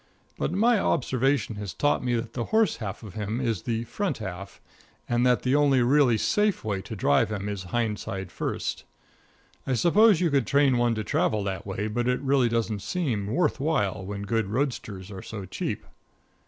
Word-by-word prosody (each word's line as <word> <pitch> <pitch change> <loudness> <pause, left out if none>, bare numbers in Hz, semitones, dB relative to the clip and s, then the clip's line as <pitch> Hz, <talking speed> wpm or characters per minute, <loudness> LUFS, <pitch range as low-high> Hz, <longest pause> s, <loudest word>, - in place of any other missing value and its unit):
But - - 0
my 220 +4 +3
observation 130 - +1
has 105 -3 -6
taught 145 - +1
me 125 -1 +1
that 115 0 -3
the 120 -2 -2
horse 220 -1 +2
half 105 0 -6
of 105 - -9
him 110 +2 -3
is 115 -8 -1
the 115 -1 -2
front 170 - -2
half, 95 -2 -7 0.5
and 120 0 +1
that 125 -3 +2
the 130 - +1
only 140 -3 +4
really 130 -2 +4
safe 210 - +1
way 100 -3 -2
to 110 - -7
drive 70 -4 +2
him 100 -1 -3
is 100 -3 -4
hind 110 +2 -1
side 95 -2 -5
first. - - -3 0.8
I 130 - +1
suppose 200 - +5
that 180 - -1
you 165 - +2
could 135 -4 +2
train 140 -3 +3
one 120 -1 +2
to 110 - -2
travel 105 0 0
that 95 0 -4
way, 100 +2 -2
but 120 +3 -1
it 125 0 +1
really 135 -3 +2
doesn't 115 -3 -1
seem 120 - -2
worth 150 - +1
while 130 - 0
when 100 +1 -5
good 110 +1 0
roadsters 105 -5 -3
are 95 -2 -7
so 100 -3 -7
cheap. 95 - -4
115 Hz, 195 wpm, -26 LUFS, 105-140 Hz, 0.8 s, suppose